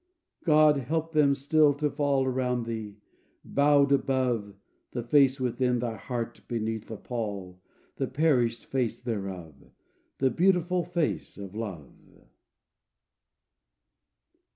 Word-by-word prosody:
"God 155 Hz, -2 st, +5 dB
help 160 Hz, +5 st, -2 dB
them 145 Hz, -2 st, +4 dB
still 145 Hz, +1 st, +3 dB
to 150 Hz, +1 st, 0 dB
fall 140 Hz, -2 st, +1 dB
Around 125 Hz, -2 st, -1 dB
thee, 110 Hz, -3 st, -5 dB, 0.5 s
bowed 140 Hz, 0 st, +3 dB
above 130 Hz, -7 st, 0 dB, 0.4 s
The 120 Hz, -, -3 dB
face 135 Hz, +2 st, +4 dB
within 125 Hz, 0 st, 0 dB
thy 115 Hz, -1 st, -2 dB
heart, 120 Hz, +2 st, -5 dB
beneath 110 Hz, -2 st, -3 dB
the 110 Hz, -, -6 dB
pall, 100 Hz, -7 st, -5 dB, 0.4 s
The 135 Hz, -, -1 dB
perished 130 Hz, -5 st, +1 dB
face 125 Hz, -4 st, -1 dB
thereof, 95 Hz, -9 st, -5 dB, 0.6 s
The 130 Hz, -1 st, +2 dB
beautiful 180 Hz, 0 st, +2 dB
face 170 Hz, -3 st, -2 dB
of 100 Hz, -1 st, -8 dB
Love." 100 Hz, -, -6 dB
130 Hz, 110 wpm, -28 LUFS, 115-145 Hz, 0.6 s, God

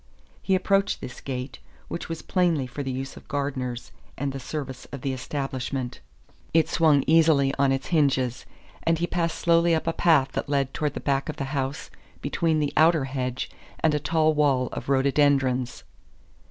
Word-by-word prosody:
He 190 Hz, -, +2 dB
approached 195 Hz, +2 st, +1 dB
this 125 Hz, -, -8 dB
gate, 130 Hz, 0 st, -5 dB, 0.3 s
which 170 Hz, -, -5 dB
was 165 Hz, -1 st, -5 dB
plainly 170 Hz, -7 st, +1 dB
for 130 Hz, +3 st, -6 dB
the 135 Hz, -, -3 dB
use 135 Hz, +1 st, -4 dB
of -, -, -14 dB
gardeners 130 Hz, -4 st, -3 dB, 0.3 s
and 140 Hz, 0 st, -2 dB
the 135 Hz, -, -5 dB
service 130 Hz, -1 st, -6 dB
of 140 Hz, -, -8 dB
the 135 Hz, 0 st, -1 dB
establishment; 130 Hz, -1 st, -4 dB, 0.6 s
it 165 Hz, -, +5 dB
swung 155 Hz, -5 st, +4 dB
easily 155 Hz, -4 st, +4 dB
on 140 Hz, -1 st, +4 dB
its 135 Hz, 0 st, -2 dB
hinges, 135 Hz, -6 st, +1 dB, 0.3 s
and 165 Hz, 0 st, +2 dB
he 170 Hz, -, 0 dB
passed 170 Hz, -2 st, -1 dB
slowly 170 Hz, 0 st, +3 dB
up 160 Hz, -, -2 dB
a 165 Hz, -, 0 dB
path 150 Hz, -7 st, +3 dB
that -, -, -3 dB
led 140 Hz, -2 st, 0 dB
towards 150 Hz, -1 st, -2 dB
the -, -, -4 dB
back 140 Hz, +1 st, 0 dB
of 155 Hz, -, -3 dB
the -, -, -4 dB
house 135 Hz, 0 st, -3 dB, 0.3 s
between 160 Hz, +2 st, 0 dB
the 145 Hz, -1 st, -1 dB
outer 160 Hz, -2 st, +4 dB
hedge 130 Hz, -2 st, -3 dB, 0.3 s
and 155 Hz, -, +3 dB
a 150 Hz, -, +1 dB
tall 155 Hz, +1 st, +2 dB
wall 140 Hz, -4 st, +2 dB
of -, -, -6 dB
rhododendrons. 135 Hz, -2 st, +2 dB
140 Hz, 180 wpm, -25 LUFS, 135-160 Hz, 0.6 s, it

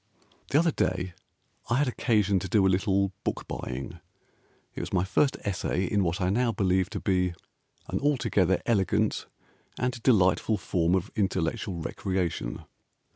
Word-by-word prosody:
The 140 Hz, -, +3 dB
other 165 Hz, +1 st, +4 dB
day 90 Hz, -7 st, -1 dB, 0.6 s
I 120 Hz, -, +2 dB
had 145 Hz, +2 st, +2 dB
occasion 105 Hz, -5 st, +2 dB
to 95 Hz, -, -5 dB
do 105 Hz, -3 st, +4 dB
a 95 Hz, -, +4 dB
little 100 Hz, -1 st, +1 dB
book -, -, -3 dB
buying. 65 Hz, +1 st, -5 dB, 0.7 s
It -, -, -6 dB
was -, -, -5 dB
my 90 Hz, -2 st, +2 dB
first 135 Hz, +9 st, +1 dB
essay 95 Hz, -1 st, -1 dB
In 100 Hz, +2 st, +1 dB
what 85 Hz, +2 st, -1 dB
I 90 Hz, -1 st, +1 dB
now 120 Hz, +3 st, +2 dB
believe 95 Hz, -3 st, +1 dB
to 105 Hz, -1 st, -4 dB
be 90 Hz, -3 st, +1 dB, 0.5 s
An -, -, -2 dB
altogether 115 Hz, -10 st, +2 dB
elegant 105 Hz, -1 st, +1 dB, 0.5 s
and 125 Hz, -1 st, -2 dB
delightful 105 Hz, -2 st, +3 dB
form 90 Hz, -1 st, +1 dB
Of 95 Hz, -, -2 dB
intellectual 95 Hz, -2 st, -1 dB
recreation. 95 Hz, 0 st, -2 dB
95 Hz, 150 wpm, -28 LUFS, 90-110 Hz, 0.7 s, other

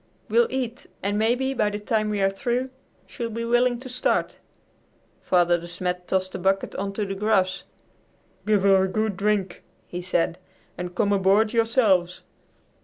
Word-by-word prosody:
We'll 475 Hz, 0 st, +4 dB
eat, 255 Hz, -2 st, -4 dB, 0.2 s
and 200 Hz, +1 st, 0 dB
maybe 250 Hz, +4 st, +1 dB
by 215 Hz, -5 st, +1 dB
the 205 Hz, -, -4 dB
time 215 Hz, +1 st, -1 dB
we 205 Hz, -2 st, 0 dB
are 195 Hz, -, +4 dB
through 245 Hz, +6 st, -2 dB, 0.3 s
she'll 235 Hz, -3 st, -5 dB
be 230 Hz, +1 st, -4 dB
willing 240 Hz, +1 st, +2 dB
to 260 Hz, -, -8 dB
start." 250 Hz, 0 st, -1 dB, 0.8 s
Father 175 Hz, -1 st, +3 dB
De 170 Hz, -, -9 dB
Smet 180 Hz, 0 st, -4 dB
tossed 185 Hz, 0 st, 0 dB
a -, -, -4 dB
bucket 195 Hz, +1 st, 0 dB
on 195 Hz, +1 st, -2 dB
to 210 Hz, +1 st, -2 dB
the 195 Hz, -, -4 dB
grass. 195 Hz, -2 st, +1 dB, 0.8 s
"Give 210 Hz, -3 st, +3 dB
her 195 Hz, -1 st, +5 dB
a -, -, -1 dB
good 215 Hz, +1 st, -1 dB
drink," 200 Hz, -2 st, -1 dB, 0.2 s
he 180 Hz, -, -6 dB
said, 175 Hz, -1 st, -1 dB, 0.4 s
"and 180 Hz, 0 st, -6 dB
come 205 Hz, +1 st, +2 dB
aboard 200 Hz, +3 st, +3 dB
yourselves." 220 Hz, -6 st, +2 dB
205 Hz, 170 wpm, -24 LUFS, 185-230 Hz, 0.8 s, her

